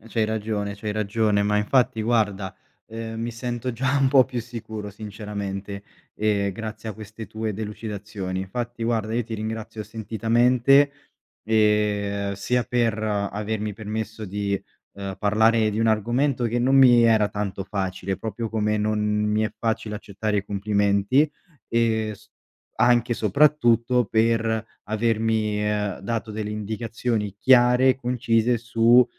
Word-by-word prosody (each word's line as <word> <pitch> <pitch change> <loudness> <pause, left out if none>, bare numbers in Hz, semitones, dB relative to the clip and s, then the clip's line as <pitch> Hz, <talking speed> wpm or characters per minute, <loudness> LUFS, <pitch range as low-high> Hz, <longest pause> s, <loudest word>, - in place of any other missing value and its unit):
E - - -18
c'hai 110 -1 0
ragione, 105 -2 -2
c'hai 105 +1 -4
ragione, 105 0 +1
ma 105 +1 +1
infatti 110 +1 +2
guarda, 105 -4 0 0.3
ehm, 115 0 -6
mi 115 +1 -2
sento 120 +1 -4
già 130 +4 0
un 135 - +4
po' 130 -2 +6
più 125 -2 -4
sicuro 110 -3 -7
sinceramente, 100 -1 -6 0.3
ehm, 100 -2 0
grazie 110 +2 -6
a - - -3
queste 110 +1 -9
tue 110 +2 -4
delucidazioni. 105 -2 -5
Infatti 120 +5 -4
guarda 110 -2 -1
io 120 -1 0
ti 115 - -6
ringrazio 110 0 -5
sentitamente, 120 +6 +3 0.5
ehm, 105 -2 +1
sia 120 +5 0
per 115 -2 0
avermi 105 0 -2
permesso 110 0 -5
di, 100 0 -2 0.3
ehm, 100 -1 -6
parlare 110 +1 +3
di 105 +2 -2
un 115 - +3
argomento 120 +5 +1
che 120 +1 0
non 130 +3 +3
mi 125 -3 +7
era 110 -3 +4
tanto 100 -2 -4
facile, 95 -1 -3
proprio 110 +1 -4
come 105 -1 0
non 105 0 0
mi 105 0 +1
è 105 -1 -1
facile 110 -2 -2
accettare 105 0 -2
i 100 - -3
complimenti, 100 +6 +2 0.4
ehm, 110 -2 +1
s 110 +1 -15 0.5
anche 120 0 +4
soprattutto 120 0 +3
per 115 +1 +1 0.2
avermi, 110 -1 0
ehm, 105 -2 -1
dato 110 +1 -3
delle 105 0 -4
indicazioni 110 0 -3
chiare 125 +2 +5
e 130 - +4
concise 120 -2 +1
su, 115 +1 +4
110 Hz, 140 wpm, -24 LUFS, 105-115 Hz, 0.5 s, mi